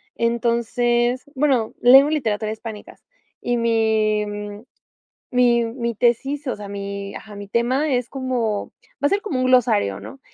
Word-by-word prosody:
entonces, 240 +1 0
bueno, 260 -5 +1
leo 270 +4 +7
literatura 220 -8 -1
hispánicas 220 -1 -9 0.4
y 245 0 0
mi 220 -2 +1 1.1
mi 240 -1 +3
mi 235 0 -3
tesis, 270 +6 0
o 255 - -1
sea, 205 -1 -9
mi 200 0 -6
ajá, 215 -1 -10
mi 205 0 -8
tema 260 +7 +1
es 245 -1 -1
como 245 -6 -2 0.4
va - - +5
a - - -1
ser 400 +1 +1
como 310 -12 -3
un 255 - +1
glosario, 230 - +2
¿no?, 275 - -11
235 Hz, 145 wpm, -21 LUFS, 220-255 Hz, 1.1 s, leo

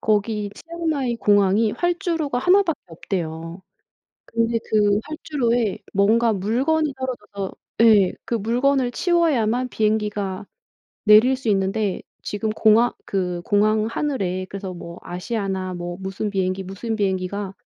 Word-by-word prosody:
거기 210 -1 0
치앙마이 320 -7 -2
공항이 205 +1 +3
활주로가 335 -6 -1
하나밖에 355 +1 +3
없대요. 165 0 -5 0.6
근데 230 0 0
그 210 -1 +3
활주로에 245 -8 -1 0.2
뭔가 220 +3 +3
물건이 270 +10 +1
떨어져서 210 -7 -5 0.3
예. 210 -5 +6
그 - - -4
물건을 245 +4 +1
치워야만 255 -9 +1
비행기가 210 -3 -1 0.6
내릴 220 +5 +6
수 255 -3 -7
있는데 195 0 0 0.2
지금 215 +1 -3
공항 220 +2 +4
그 180 -3 -2
공항 215 0 +2
하늘에 210 -8 -2
그래서 195 -1 -6
뭐 170 -1 -9
아시아나 190 0 -3
뭐 175 0 -5
무슨 195 +2 -3
비행기 190 -1 -1
무슨 215 +4 -4
비행기가 195 0 -2
215 Hz, 290 characters per minute, -22 LUFS, 195-245 Hz, 0.6 s, 예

